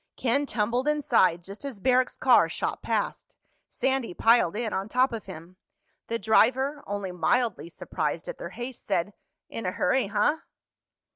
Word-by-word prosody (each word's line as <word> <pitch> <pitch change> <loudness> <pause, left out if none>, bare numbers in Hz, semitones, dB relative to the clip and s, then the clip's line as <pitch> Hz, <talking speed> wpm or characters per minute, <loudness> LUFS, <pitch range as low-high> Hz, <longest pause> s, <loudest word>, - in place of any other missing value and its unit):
Ken 280 +4 +1
tumbled 240 +5 -1
inside 185 - +2
just 195 +7 -9
as 270 -7 -6
Barrack's 255 +3 +2
car - - +5
shot - - -3
past. - - -3 0.3
Sandy 265 -8 -1
piled 225 -6 +4
in 225 -1 -2
on 195 +2 -3
top 255 +2 +2
of 220 -3 -6
him. 180 0 -10 0.5
The 230 - -1
driver, 260 +7 +2
only 200 -2 -3
mildly 205 +1 0
surprised 175 - -4
at - - -6
their - - -6
haste, 245 +1 -8
said, 180 +4 -1 0.3
"In 230 - -6
a - - 0
hurry, 230 +4 +1
huh?" 295 +9 +1
230 Hz, 155 wpm, -27 LUFS, 195-260 Hz, 0.5 s, car